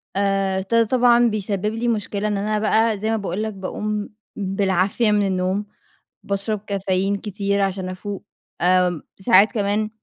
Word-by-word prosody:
آآ 195 Hz, -1 st, +1 dB
ط 190 Hz, +4 st, -6 dB
طبعًا 240 Hz, +1 st, +4 dB
بيسبب 205 Hz, -2 st, -2 dB
لي 235 Hz, +1 st, -2 dB
مشكلة 210 Hz, -2 st, -1 dB
إن 210 Hz, -1 st, -1 dB
أنا 210 Hz, +1 st, -1 dB
بقى 220 Hz, +1 st, +2 dB
زي 215 Hz, +2 st, -2 dB
ما 225 Hz, -, +1 dB
باقول 200 Hz, 0 st, -3 dB
لك 220 Hz, 0 st, -3 dB
باقوم 205 Hz, +2 st, -4 dB, 0.3 s
بالعافية 195 Hz, +2 st, +1 dB
من 205 Hz, -1 st, +2 dB
النوم، 190 Hz, +2 st, -1 dB, 0.6 s
باشرب 200 Hz, +2 st, -2 dB
كافيين 195 Hz, 0 st, 0 dB
كتير 200 Hz, 0 st, -2 dB
عشان 190 Hz, -1 st, -1 dB
افوق، 195 Hz, +2 st, -6 dB, 0.4 s
آمم، 180 Hz, -2 st, +3 dB, 0.2 s
ساعات 195 Hz, +1 st, +5 dB
كمان 210 Hz, -1 st, 0 dB
200 Hz, 150 wpm, -22 LUFS, 190-215 Hz, 0.6 s, ساعات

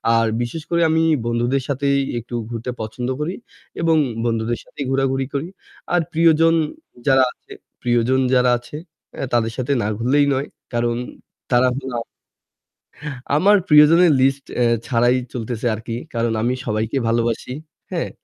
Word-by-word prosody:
আর 115 Hz, 0 st, +3 dB
বিশেষ 120 Hz, +7 st, -4 dB
করে 170 Hz, 0 st, +1 dB
আমি 160 Hz, +1 st, +2 dB, 0.2 s
বন্ধুদের 120 Hz, +3 st, 0 dB
সাথেই 140 Hz, 0 st, +1 dB, 0.2 s
একটু 120 Hz, +1 st, -8 dB
ঘুরতে 120 Hz, +1 st, -4 dB
পছন্দ 120 Hz, +3 st, -4 dB
করি 165 Hz, +5 st, -2 dB, 0.5 s
এবং 165 Hz, -1 st, +3 dB, 0.3 s
বন্ধুদের 115 Hz, 0 st, -1 dB
সাথেই 140 Hz, -, -7 dB
ঘোরাঘুরি 135 Hz, 0 st, +1 dB
করি। 140 Hz, +3 st, -2 dB, 0.5 s
আর 175 Hz, -, +4 dB
প্রিয়জন 165 Hz, 0 st, +4 dB, 0.5 s
যারা 135 Hz, -1 st, +5 dB
আছে -, -, -23 dB, 0.3 s
প্রিয়জন 120 Hz, +2 st, +2 dB
যারা 125 Hz, -1 st, +4 dB
আছে 120 Hz, +5 st, -9 dB, 0.6 s
তাদের 115 Hz, -1 st, +2 dB
সাথে 130 Hz, +1 st, -2 dB
না -, -, -1 dB
ঘুরলেই 135 Hz, +6 st, +3 dB
নয়। 135 Hz, +2 st, -2 dB, 0.3 s
কারণ 120 Hz, 0 st, 0 dB, 0.6 s
তারা 125 Hz, +1 st, +4 dB
হলো 135 Hz, -1 st, -6 dB
আ -, -, 0 dB, 1.4 s
আমার 200 Hz, +7 st, +5 dB
প্রিয়জনের 155 Hz, +3 st, +7 dB
লিস্ট 135 Hz, +1 st, +2 dB, 0.2 s
এ -, -, +4 dB, 0.2 s
ছাড়াই 120 Hz, 0 st, +3 dB, 0.2 s
চলতেছে 120 Hz, -1 st, -4 dB
আরকি। 115 Hz, +1 st, -5 dB, 0.2 s
কারণ 115 Hz, 0 st, 0 dB
আমি 120 Hz, +2 st, +1 dB
সবাইকে 110 Hz, +3 st, -1 dB
ভালোবাসি। 115 Hz, +2 st, -1 dB, 0.4 s
হ্যাঁ? 170 Hz, -2 st, -2 dB
125 Hz, 140 wpm, -20 LUFS, 120-145 Hz, 1.4 s, প্রিয়জনের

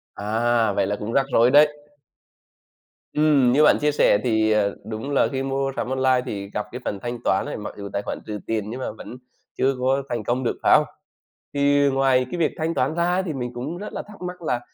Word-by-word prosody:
À! 110 Hz, +1 st, +1 dB
Vậy 95 Hz, -, +1 dB
là 105 Hz, -, -1 dB
cũng 105 Hz, +3 st, -5 dB
rắc 135 Hz, -, +3 dB
rối 120 Hz, +2 st, +5 dB
đấy. 150 Hz, +1 st, +5 dB, 1.4 s
Ừm, 145 Hz, -5 st, +4 dB
như 150 Hz, +4 st, +4 dB
bạn 150 Hz, -, +5 dB
chia 150 Hz, 0 st, +2 dB
sẻ 120 Hz, -7 st, +4 dB
thì, 110 Hz, -2 st, +2 dB
à, 105 Hz, -1 st, +3 dB, 0.2 s
đúng 110 Hz, +6 st, -5 dB
là 140 Hz, -, +3 dB
khi 135 Hz, 0 st, -2 dB
mua 135 Hz, 0 st, -1 dB
sắm -, -, -3 dB
online 130 Hz, -1 st, +2 dB
thì 100 Hz, -1 st, -5 dB
gặp 105 Hz, -, -2 dB
cái 125 Hz, +1 st, -7 dB
phần 100 Hz, -, -3 dB
thanh 120 Hz, 0 st, -4 dB
toán 95 Hz, -, +1 dB
ấy, -, -, -5 dB
mặc 105 Hz, -, -7 dB
dù 100 Hz, -1 st, -6 dB
tài 100 Hz, -, -1 dB
khoản -, -, -4 dB
trừ 105 Hz, -1 st, -5 dB
tiền 110 Hz, -2 st, -2 dB
nhưng 125 Hz, +4 st, -6 dB
mà -, -, -3 dB
vẫn 115 Hz, +3 st, -10 dB, 0.4 s
chưa 135 Hz, +1 st, +2 dB
có 135 Hz, +2 st, +1 dB
thành 120 Hz, -3 st, -2 dB
công 125 Hz, +4 st, -1 dB
được, 120 Hz, -, -1 dB
phải -, -, +5 dB
không? -, -, +1 dB, 0.7 s
Thì 145 Hz, 0 st, +3 dB
ngoài 135 Hz, -1 st, +2 dB
cái 175 Hz, -, -4 dB
việc 165 Hz, -, +1 dB
thanh 165 Hz, +1 st, -1 dB
toán 135 Hz, +2 st, 0 dB
ra 170 Hz, +1 st, +1 dB
ấy, 185 Hz, -, +1 dB
thì 180 Hz, -4 st, -4 dB
mình 125 Hz, -3 st, -4 dB
cũng 145 Hz, +8 st, -5 dB
rất 210 Hz, +2 st, -7 dB
là -, -, -4 dB
thắc 210 Hz, -3 st, -13 dB
mắc 180 Hz, -1 st, -6 dB
là 125 Hz, -6 st, -1 dB
130 Hz, 240 wpm, -23 LUFS, 110-145 Hz, 1.4 s, rối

